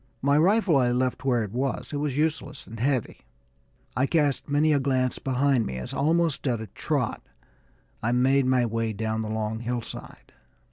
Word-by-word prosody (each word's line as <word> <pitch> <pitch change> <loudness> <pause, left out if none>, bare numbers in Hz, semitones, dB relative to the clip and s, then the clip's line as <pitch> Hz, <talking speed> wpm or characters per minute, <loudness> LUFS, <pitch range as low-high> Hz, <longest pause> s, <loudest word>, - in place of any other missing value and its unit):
My 140 +1 +3
rifle 180 +1 +4
I 125 -2 +3
left 130 +1 -1
where 120 -4 +2
it 105 - -6
was; 130 +5 -3
it - - -1
was 145 -2 -2
useless 150 -2 -2
and 115 0 -10
heavy. 130 -1 -1 0.8
I 130 +4 +2
cast 145 -4 +1
many 150 +2 +3
a 145 - +3
glance 130 -2 0
behind 135 -3 +1
me 65 - -4
as, 65 - -6
almost 160 -1 +1
at 120 -3 0
a 110 - -5
trot, 105 - -2 0.8
I 115 - 0
made 130 +2 +3
my 130 -1 +3
way 115 -1 -1
down 110 +1 -2
the 110 - -4
long 110 0 -2
hillside. 120 0 -6
130 Hz, 180 wpm, -26 LUFS, 115-145 Hz, 0.8 s, rifle